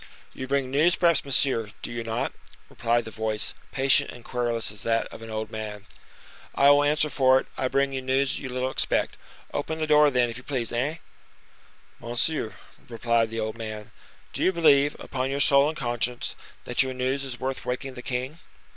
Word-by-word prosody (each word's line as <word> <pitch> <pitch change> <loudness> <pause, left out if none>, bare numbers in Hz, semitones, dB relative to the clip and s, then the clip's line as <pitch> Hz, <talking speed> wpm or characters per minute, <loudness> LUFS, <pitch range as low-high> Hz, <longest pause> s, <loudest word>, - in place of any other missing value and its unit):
"You 130 - -6
bring 135 -1 0
news, 160 +6 +4
perhaps, 170 -4 +3
monsieur, 130 -5 +1
do - - -5
you 120 -1 -4
not?" 115 0 -2 0.4
replied 120 0 0
the 110 - -7
voice, 110 -1 -2 0.2
patient 135 +1 +3
and 120 - -11
querulous 120 -3 0
as 105 -1 -6
that 115 +1 +1
of - - -11
an 115 - -8
old 110 0 -4
man. 105 -2 -6 0.7
"I 140 +1 +6
will 145 0 +5
answer 150 +1 +3
for 130 -2 +4
it, - - -7
I 130 - 0
bring 140 +1 +1
you 130 - -2
news 130 +1 +1
you 130 - -6
little 130 +1 -2
expect. - - 0 0.4
Open 155 +2 -2
the 160 - -1
door, 150 -1 +6
then, 125 -3 +2
if 115 0 -6
you 125 - -10
please, 125 -5 -2
hein!" 140 +7 -1 1.0
"Monsieur," 120 +1 -1 0.3
persisted 115 -1 +1
the 115 0 -4
old 110 +1 -3
man, 110 -1 -6 0.4
"do - - -2
you 185 - +4
believe, 145 -5 +4
upon 130 0 -3
your 140 +1 -2
soul 140 0 +5
and 155 - -6
conscience, 120 -2 -1 0.3
that 125 - +1
your 130 -1 -1
news 130 +2 -1
is 130 -3 -5
worth 130 +1 -3
waking 130 +1 -3
the 125 - -8
king?" 130 +6 -4
130 Hz, 195 wpm, -26 LUFS, 115-140 Hz, 1.0 s, I